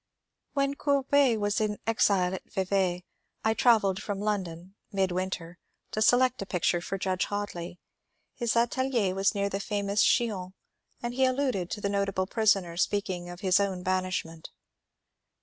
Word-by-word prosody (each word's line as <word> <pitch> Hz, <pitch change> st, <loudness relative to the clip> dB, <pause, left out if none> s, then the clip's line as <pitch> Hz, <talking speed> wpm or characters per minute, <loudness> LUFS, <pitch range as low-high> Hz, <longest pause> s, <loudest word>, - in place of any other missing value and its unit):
When 275 Hz, -1 st, +1 dB
Courbet 280 Hz, -3 st, +2 dB
was 205 Hz, +2 st, 0 dB
in 210 Hz, -1 st, 0 dB
exile 195 Hz, -5 st, +2 dB
at 190 Hz, -, -5 dB
Yevay 185 Hz, -2 st, +1 dB, 0.4 s
I 220 Hz, -, +4 dB
travelled 215 Hz, -5 st, +3 dB
from 205 Hz, -2 st, -4 dB
London 190 Hz, -4 st, -3 dB, 0.2 s
(midwinter) 185 Hz, -3 st, -2 dB, 0.3 s
to 215 Hz, -, -2 dB
select 250 Hz, +2 st, +4 dB
a 195 Hz, -, -5 dB
picture 175 Hz, -1 st, +1 dB
for 195 Hz, -, -4 dB
Judge 185 Hz, -1 st, 0 dB
Hoadly. 180 Hz, -4 st, -5 dB, 0.6 s
His 235 Hz, -2 st, -1 dB
atelier 235 Hz, -4 st, +1 dB
was 195 Hz, +1 st, +1 dB
near 200 Hz, 0 st, 0 dB
famous 200 Hz, 0 st, -1 dB
Chillon, 195 Hz, -6 st, +1 dB, 0.5 s
and 240 Hz, 0 st, -2 dB
he 260 Hz, +1 st, +3 dB
alluded 255 Hz, -9 st, 0 dB
to 210 Hz, -, -5 dB
the 200 Hz, -, 0 dB
notable 200 Hz, -2 st, 0 dB
prisoner 195 Hz, -4 st, +2 dB
in 170 Hz, -, -10 dB
speaking 185 Hz, -3 st, -1 dB
of 175 Hz, 0 st, -9 dB
his 185 Hz, -1 st, +3 dB
own 190 Hz, -3 st, -1 dB
banishment. 185 Hz, -3 st, -2 dB
200 Hz, 150 wpm, -28 LUFS, 185-225 Hz, 0.6 s, I